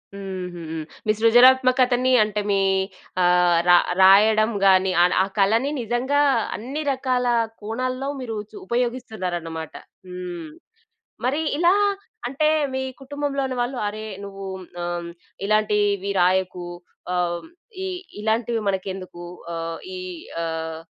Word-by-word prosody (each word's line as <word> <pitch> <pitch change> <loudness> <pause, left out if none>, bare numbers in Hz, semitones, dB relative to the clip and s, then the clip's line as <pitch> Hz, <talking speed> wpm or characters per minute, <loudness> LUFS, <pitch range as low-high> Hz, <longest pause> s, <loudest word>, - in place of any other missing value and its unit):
హుహు. 185 -3 -6 0.4
మీ 215 - +3
సృజనాత్మకతని 255 +2 +5
అంటే, 210 0 -2
మీ 195 - +3 0.6
ఆహ్, 175 -1 +4
రా 175 - +9 0.2
రాయడం 215 +3 +6
గానీ, 190 -1 +5
ఆడ 180 - +5
ఆ - - 0
కళని 225 +8 +3
నిజంగా 245 +5 +1 0.4
అన్ని 270 +7 -5
రకాలా 250 -2 0 0.3
కోణాల్లో 255 +5 -3
మీరూ 230 -4 -4
చు - - -14
ఉపయోగిస్తున్నారన్నమాట. 185 -10 -3 0.3
హ్మ్. 180 -2 -6 0.8
మరి 280 +5 +1 0.2
ఇలా 345 +3 +4 0.5
అంటే, 280 +4 +1 0.3
మీ 265 - -1 0.2
కుటుంబంలోని 275 -1 -2
వాళ్ళు, 245 +1 -2
అరే, 215 +1 -5 0.2
నువ్వూ 195 -1 -8 0.2
మ్ - - -16 0.2
ఆహ్, 175 0 -2
హ్మ్, 170 - -7 0.4
ఇలాంటీవి 205 -2 +1
రాయకు 185 0 +1 0.5
ఆహ్, 180 -1 +1
హ్మ్, - - -15 0.3
ఇ - - -2 0.3
ఇలాంటివి 225 +1 0
మనకెందుకు, 190 -2 -4 0.3
ఆహ్, 165 0 -4 0.2
ఈ - - -5 0.5
ఆహ్, 160 0 -4
215 Hz, 115 wpm, -23 LUFS, 180-255 Hz, 0.8 s, రా